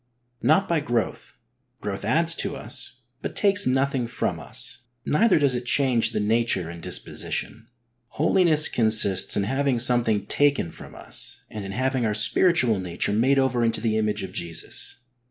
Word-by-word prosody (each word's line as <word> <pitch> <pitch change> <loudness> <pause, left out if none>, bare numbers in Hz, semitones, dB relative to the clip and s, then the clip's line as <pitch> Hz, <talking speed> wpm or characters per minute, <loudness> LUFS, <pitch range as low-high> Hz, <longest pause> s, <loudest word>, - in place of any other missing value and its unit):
Not 190 +6 +2
by 170 -2 0
growth. 120 -6 -4 0.5
Growth 100 -1 -6
adds 165 +10 +2
to - - -4
us, 130 -2 -1 0.2
but - - -6
takes 200 0 +2
nothing 135 -1 0
from - - -4
iis, - - -1 0.3
neither 205 +5 +2
does 140 -4 +1
it 125 0 -5
change 125 -5 +3
the 115 - -4
nature 105 -5 0
and 85 0 -11
disposition. 115 +6 -4 0.4
Holiness 155 +1 +2
consists 110 -4 +3
in 100 - 0
having 135 +4 -1
something 115 -4 +3
taken 140 - 0
from - - -13
us - - -5
and 105 -2 -7
in 95 - -7
having 130 +1 -1
our 105 -2 -1
spiritual 120 - +3
nature 90 +2 0
made 130 +6 +2
over 130 -3 +1
into 115 -1 0
the 110 -1 -1
image 105 -2 -1
of 95 -1 -8
Jesus. 85 -3 -4
120 Hz, 160 wpm, -23 LUFS, 105-140 Hz, 0.5 s, change